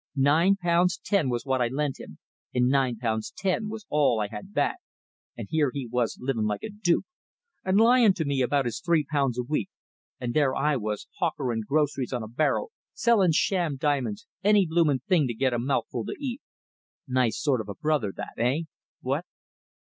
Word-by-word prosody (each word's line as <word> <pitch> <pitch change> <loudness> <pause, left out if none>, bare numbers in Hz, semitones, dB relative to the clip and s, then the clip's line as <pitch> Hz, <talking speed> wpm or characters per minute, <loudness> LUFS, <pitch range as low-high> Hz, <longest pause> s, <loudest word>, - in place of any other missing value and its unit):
Nine 155 +8 +4
pounds 175 -1 +2
ten 195 -9 +2
it - - 0
was 120 +1 -2
I 130 -2 +2
lent 140 +2 -2
him, - - -10 0.4
and 125 0 +3
nine 130 -3 +2
pounds 110 -1 -2
ten 200 +3 -1
was 215 -1 -7
all 145 -6 +2
I 105 -1 -1
had 195 - -8
back, 290 - 0 0.6
and - - -6
here 155 -3 +2
he 140 0 -4
was 120 0 -1
living 125 -4 -1
like 105 -1 -2
a 220 - -5
duke, 200 -5 +1 0.6
and 190 +1 +2
lying 230 -3 +5
to 160 - -2
me 140 -2 0
about 135 +2 +1
his 115 -2 -3
three 165 -3 +2
pounds 140 -4 0
a 125 - 0
week; 120 -5 -2 0.5
and 120 -1 -3
there 145 -4 +3
was 110 -10 -1
I - - -27
hawkering 135 -9 -1
groceries 140 -3 0
on 120 -3 -2
a - - -6
barrow, 155 - 0 0.3
selling 200 -8 +3
sham 170 -4 +1
diamonds, 130 -6 -1 0.2
any 205 -1 +5
blooming 160 -5 +2
thing 170 -8 +3
to 120 - -4
get 130 +1 +1
a 120 - 0
mouthful 125 -2 -1
to - - -4
eat. 270 -2 -4 0.7
Nice 125 -3 +1
sort 135 -6 +1
of 105 - -9
brother 150 -10 0
that, - - -6
eh? 125 +7 +1 0.4
What?" - - -1
140 Hz, 190 wpm, -26 LUFS, 125-170 Hz, 0.7 s, lying